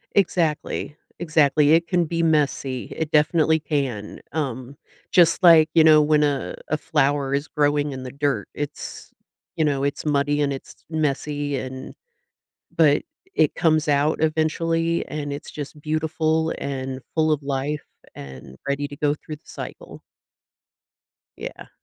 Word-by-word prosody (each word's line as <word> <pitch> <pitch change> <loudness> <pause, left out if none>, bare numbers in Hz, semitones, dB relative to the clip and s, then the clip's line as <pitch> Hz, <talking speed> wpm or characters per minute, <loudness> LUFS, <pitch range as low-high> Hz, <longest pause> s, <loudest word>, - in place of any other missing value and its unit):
Exactly, 160 -6 0 0.2
exactly, 155 -3 +3
it 170 +1 +4
can 180 -2 +2
be 165 +1 -2
messy, 140 -5 0
it 160 -1 -2
definitely 155 +1 +3
can, 135 -8 -3
um, 135 -3 -4 0.3
just 170 +1 +4
like, 165 -3 +7
you 160 - +6
know, 155 -1 +7
when 150 0 +3
a 145 -3 0
a 155 - +1
flower 145 -2 0
is 140 +2 -1
growing 145 -1 +1
in 130 -1 -6
the 130 - -6
dirt, 140 -6 -1
it's 145 -1 -6 0.5
you 160 - +2
know, 140 -2 0
it's 140 0 -2
muddy 145 0 +1
and 140 -1 +1
it's 135 - -8 0.2
messy 145 -2 -1
and 130 0 -6 0.8
but 150 -3 +4 0.3
it 155 - +2
comes 155 -1 +2
out 145 +2 +2
eventually, 165 +1 0
and 145 -1 -4
it's 145 - -7
just 150 0 -8
beautiful, 160 +1 0
and 130 -1 -4
full 160 -1 +2
of 150 -1 +1
life, 140 +2 -2 0.3
and 65 -1 -10
ready 140 +1 -1
to 145 - -9
go 145 0 +1
through 150 0 -9
the - - -30
cycle. - - -9 1.4
Yeah. - - -8
150 Hz, 145 wpm, -23 LUFS, 140-160 Hz, 1.4 s, like